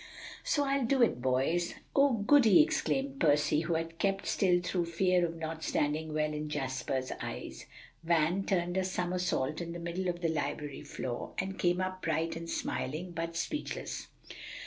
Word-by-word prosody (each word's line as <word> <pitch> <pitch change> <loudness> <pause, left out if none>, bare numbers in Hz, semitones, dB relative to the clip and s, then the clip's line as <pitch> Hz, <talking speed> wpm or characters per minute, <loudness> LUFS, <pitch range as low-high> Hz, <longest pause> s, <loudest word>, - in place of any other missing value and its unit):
"So 290 - +2
I'll 275 -2 +1
do 265 -1 +4
it, 175 - +2
boys." 135 +7 +1 0.2
"Oh, 275 -1 +5
goody!" 225 +2 +6
exclaimed 275 -3 -1
Percy, 150 -1 +3
who 165 +1 -1
had 165 +1 -3
kept 195 0 0
still 180 -3 +3
through 180 0 -1
fear 180 +1 +2
of 165 -1 -1
not 160 0 -5
standing 155 +2 0
well 155 0 0
in 150 0 -4
Jasper's 130 -2 -2
eyes. - - -6 0.4
Van 170 +3 +2
turned 175 -2 0
a 190 - +2
somersault 180 -5 -1
in 170 0 -5
the - - -5
middle 170 +2 -3
of 175 -1 -2
the 165 - +1
library 150 -2 -3
floor, 120 -1 -5
and 190 0 -3
came 175 0 +2
up 185 0 -2
bright 165 +1 0
and 165 0 -6
smiling, 160 +6 -3
but 165 0 -4
speechless. 300 - -3
170 Hz, 170 wpm, -31 LUFS, 155-185 Hz, 0.4 s, goody